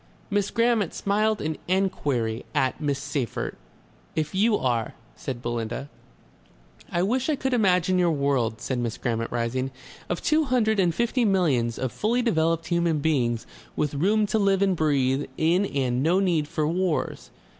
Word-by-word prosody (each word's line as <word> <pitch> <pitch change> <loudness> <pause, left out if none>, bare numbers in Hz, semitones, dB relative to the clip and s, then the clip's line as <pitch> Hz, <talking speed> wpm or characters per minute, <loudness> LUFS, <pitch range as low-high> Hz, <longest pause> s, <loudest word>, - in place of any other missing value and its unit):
Miss 205 0 +1
Grammont 230 -5 +1
smiled 215 +2 +1
an 155 0 -3
enquiry 145 -12 0
at 130 +3 +1
Miss 145 -2 0
Seyffert. 140 -4 -3 0.6
"If 155 -1 -1
YOU 210 +3 +3
are," 120 -4 -1 0.2
said 125 -2 -6
Belinda. 120 +3 -3 1.0
"I 175 - +1
wish 255 +8 0
I 305 - +2
could 265 -1 -2
imagine 185 -5 +3
your 175 -1 +3
world," 140 -7 0
said 130 -2 -2
Miss 120 -2 -2
Grammont, 115 -2 -2
rising, 120 +2 -1 0.4
"of 175 - -2
two 310 +1 +3
hundred 225 -5 +2
and 175 -3 +2
fifty 240 +1 +1
millions 150 - +2
of 130 -2 -2
fully 235 - 0
developed 165 -6 +1
human 170 -2 +2
beings 125 -7 0 0.3
with 150 -1 -1
room 205 +9 +2
to 215 +2 0
live 195 -1 +3
and 195 -2 +2
breathe 140 -3 +1
in 175 +5 +2
and 130 -4 0
no 170 +6 +3
need 170 -6 +1
for 150 0 -1
wars. 175 0 -1
160 Hz, 160 wpm, -25 LUFS, 130-200 Hz, 1.0 s, YOU